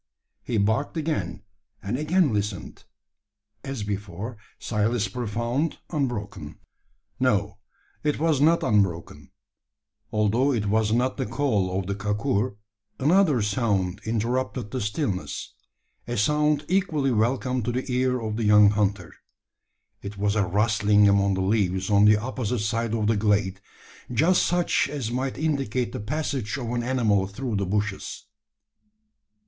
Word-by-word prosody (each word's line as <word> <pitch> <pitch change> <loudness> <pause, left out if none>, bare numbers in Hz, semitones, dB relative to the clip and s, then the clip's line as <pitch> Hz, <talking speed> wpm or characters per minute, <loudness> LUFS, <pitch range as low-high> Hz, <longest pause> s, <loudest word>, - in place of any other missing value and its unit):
He 120 - -2
barked 110 +10 0
again, 105 - -2 0.4
and 100 +4 -2
again 155 0 +2
listened. 100 -4 -4 0.8
As 135 -6 -4
before, 105 +2 -5 0.2
silence 110 0 0
profound, 120 - -2
unbroken. 120 - -3 0.6
No 105 -5 +1 0.4
it 150 - +1
was 155 -3 +1
not 165 +3 +4
unbroken. 95 -6 0 0.8
Although 115 +6 +2
it 110 -4 -1
was 110 +1 +1
not 125 +3 +1
the 130 - -2
call 105 -7 0
of 95 - -4
the 100 - -2
kakur, 105 +3 -1 0.4
another 150 - +3
sound 100 -3 0
interrupted 115 -1 -2
the 130 - -3
stillness 100 - -3 0.5
a 120 - -3
sound 150 +6 +2
equally 165 -8 +1
welcome 125 +3 0
to 120 - -2
the 125 +2 -2
ear 125 0 +1
of 110 -2 -3
the 115 - -1
young 105 -1 +6
hunter. 100 -3 -1 0.9
It 100 0 -7
was 100 +1 0
a 105 - +3
rustling 105 +1 +3
among 100 -1 +3
the 95 - -1
leaves 95 -1 0
on 100 0 +5
the 105 0 +6
opposite 125 0 -2
side 115 +1 -1
of 110 -2 0
the 110 0 +2
glade; 100 -2 +1 0.5
just 160 +10 +3
such 175 0 +1
as 135 -6 -3
might 130 +2 -2
indicate 135 -6 -1
the 130 - -5
passage 135 -1 -3
of 120 -3 -4
an 120 0 -1
animal 115 -6 +1
through 115 +2 -4
the 100 -1 -1
bushes. 105 +1 -3
110 Hz, 140 wpm, -25 LUFS, 100-130 Hz, 0.9 s, young